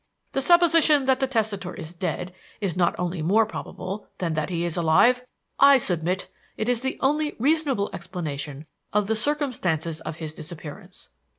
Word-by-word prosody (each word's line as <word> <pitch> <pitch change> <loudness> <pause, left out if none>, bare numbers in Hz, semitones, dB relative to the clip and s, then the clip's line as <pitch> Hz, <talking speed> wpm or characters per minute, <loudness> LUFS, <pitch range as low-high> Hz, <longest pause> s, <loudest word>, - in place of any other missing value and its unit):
The 270 - 0
supposition 330 -3 +5
that 260 -1 +3
the 265 - +1
testator 215 -7 -2
is 165 -3 -7
dead 180 0 -4 0.3
is 195 -6 -1
not 175 -2 +2
only 175 -1 -2
more 205 +8 +3
probable 200 -1 -6
than 170 -3 -2
that 155 -1 -1
he 170 -1 -1
is 170 -1 -2
alive; 185 +10 +4 0.4
I 280 0 +8
submit 180 -4 -1 0.3
it 220 - -2
is 245 -1 +1
the 265 0 -2
only 300 +2 +1
reasonable 275 -5 +1
explanation 155 -5 -5 0.3
of 210 0 +2
the 220 +2 0
circumstances 215 - -1
of 155 -1 -5
his 160 -2 -5
disappearance. 155 -1 -9
190 Hz, 165 wpm, -25 LUFS, 165-265 Hz, 0.4 s, I